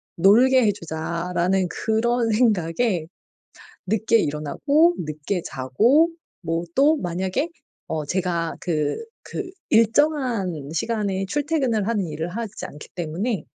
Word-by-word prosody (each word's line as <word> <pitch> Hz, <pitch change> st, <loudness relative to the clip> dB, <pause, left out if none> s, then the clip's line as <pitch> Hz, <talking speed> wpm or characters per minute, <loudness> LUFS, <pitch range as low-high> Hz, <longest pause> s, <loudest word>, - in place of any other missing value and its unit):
놀게 245 Hz, +8 st, +5 dB
해 205 Hz, -, +4 dB
주자.'라는 175 Hz, +2 st, -1 dB
그런 230 Hz, +3 st, 0 dB
생각에 200 Hz, -5 st, +1 dB, 0.8 s
늦게 220 Hz, +3 st, +2 dB
일어나고 280 Hz, -, +2 dB
늦게 155 Hz, +4 st, -3 dB
자고 220 Hz, -, +3 dB, 0.3 s
뭐 165 Hz, +1 st, -1 dB
또 300 Hz, +3 st, +5 dB
만약에 190 Hz, -, -2 dB, 0.4 s
어 155 Hz, -2 st, -2 dB
제가 170 Hz, -1 st, -1 dB
그 155 Hz, -4 st, -1 dB, 0.3 s
그 375 Hz, -3 st, -5 dB, 0.2 s
일정한 230 Hz, -, +2 dB
시간에 200 Hz, 0 st, -1 dB
출퇴근을 270 Hz, -5 st, 0 dB
하는 210 Hz, -6 st, 0 dB
일을 160 Hz, +2 st, -4 dB
하지 215 Hz, +2 st, -5 dB
않기 150 Hz, -, -12 dB
때문에 175 Hz, +4 st, -2 dB
195 Hz, 235 characters per minute, -23 LUFS, 165-235 Hz, 0.8 s, 놀게